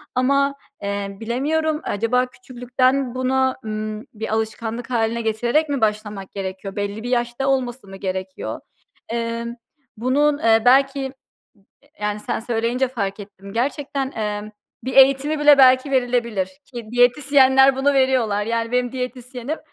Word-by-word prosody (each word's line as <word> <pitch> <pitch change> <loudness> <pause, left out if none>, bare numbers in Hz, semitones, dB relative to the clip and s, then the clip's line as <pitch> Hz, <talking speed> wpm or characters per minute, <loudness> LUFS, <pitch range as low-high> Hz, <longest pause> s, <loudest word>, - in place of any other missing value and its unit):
ama, 275 +2 +2 0.3
eee, 200 -1 -3
bilemiyorum 300 +7 -1
acaba 230 +5 +1
küçüklükten 255 +1 -1
buna, 260 0 +1
ımm, 215 0 -4
bir 220 0 -4
alışkanlık 225 +2 -3
hâline 235 -1 0
getirerek 240 +8 +1
mi 275 -4 -1
başlamak 210 -2 -2
gerekiyor? 195 0 -6
Belli 205 +1 -3
bir 245 - -4
yaşta 240 +2 -1
olması 255 -4 -1
mı 195 - -10
gerekiyor? 190 -1 -4 0.5
Emm, 235 0 -3 0.4
bunun, 285 +5 +2
eee, 225 -4 +4
belki, 270 +2 +4
ııı, 265 0 -4 0.9
yani, 210 0 -2
sen - - -3
söyleyince 235 +3 0
fark 205 -5 -3
ettim 200 -1 -11
gerçekten, 275 +3 -2
emm, 210 -1 -3 0.3
bir 260 - -3
eğitimi 275 +3 +5
bile 295 -1 +7
belki 260 +1 +6
verilebilir 240 -7 0 0.3
ki 235 -2 -7
diyetisyenler 265 +2 +5
bunu 275 +2 +2
veriyorlar. 240 -6 +2
Yani 230 +1 -1
benim 250 -1 0
diyetisyenim, 255 +2 -5
245 Hz, 135 wpm, -21 LUFS, 220-265 Hz, 0.9 s, bile